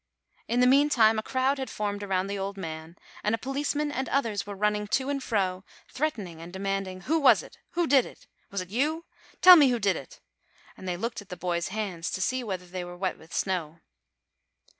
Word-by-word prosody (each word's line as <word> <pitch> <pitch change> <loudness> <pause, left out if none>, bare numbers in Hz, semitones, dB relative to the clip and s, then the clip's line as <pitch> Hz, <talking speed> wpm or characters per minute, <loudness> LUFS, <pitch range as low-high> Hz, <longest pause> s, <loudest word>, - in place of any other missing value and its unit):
In 245 +1 +1
the - - +6
meantime 250 -5 +5
a - - -1
crowd 260 +4 0
had 265 - -4
formed 205 -1 -3
around 190 -2 0
the 200 0 -4
old 195 +1 -4
man, 160 -2 -7 0.3
and 210 +2 +2
a - - -7
policeman 290 +4 -2
and 265 -1 -3
others 225 -8 0
were 205 - -5
running 210 +1 0
to 265 +6 0
and 280 -1 -2
fro, 190 -6 -1 0.3
threatening 210 - -3
and 170 +1 -9
demanding: 195 -1 -3
"Who 320 - +1
was 285 - +5
it? - - -15
Who 345 0 +1
did 275 -4 +4
it? - - -15 0.2
Was 200 -1 -3
it 185 - -9
you? 305 +8 0 0.4
Tell 365 0 +12
me 295 -5 +7
who 245 - +1
did 200 -5 +1
it!" 135 - -9 0.6
and 185 - -10
they 175 -1 -2
looked 230 +3 -3
at 205 - -17
the 180 - -7
boys' 170 -1 -1
hands 190 -5 -3
to - - -2
see 255 +5 0
whether 190 -5 -4
they 180 0 -5
were 175 0 -9
wet 185 0 -2
with 160 - -17
snow. 170 -4 -2
205 Hz, 215 wpm, -27 LUFS, 185-260 Hz, 0.6 s, Tell